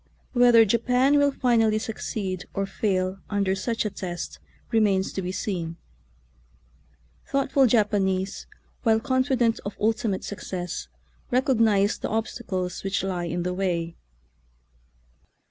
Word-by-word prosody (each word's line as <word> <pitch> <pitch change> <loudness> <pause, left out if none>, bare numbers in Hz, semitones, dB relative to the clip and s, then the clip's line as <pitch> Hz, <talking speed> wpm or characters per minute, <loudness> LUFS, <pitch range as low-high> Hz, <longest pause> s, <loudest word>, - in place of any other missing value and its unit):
Whether 240 -2 +6
Japan 250 +6 +3
will 285 0 +4
finally 225 -5 +2
succeed 205 -4 -4
or 195 - 0
fail 190 -1 -1
under 200 -2 +1
such 225 +4 -2
a 210 - -1
test 175 -3 -6 0.3
remains 205 -4 +2
to 195 - -2
be 180 0 -3
seen. 170 -4 -3 1.5
Thoughtful 275 -1 +3
Japanese, 200 -4 +1 0.3
while 225 -3 +3
confident 255 -2 +1
of 200 - -6
ultimate 215 -2 0
success, 180 -3 -5 0.4
recognize 225 -5 +2
the - - -3
obstacles 195 -5 -3
which 195 0 -1
lie 180 -2 -2
in 170 +1 -2
the 180 0 -1
way. 175 -3 -1
205 Hz, 115 wpm, -25 LUFS, 185-230 Hz, 1.5 s, Whether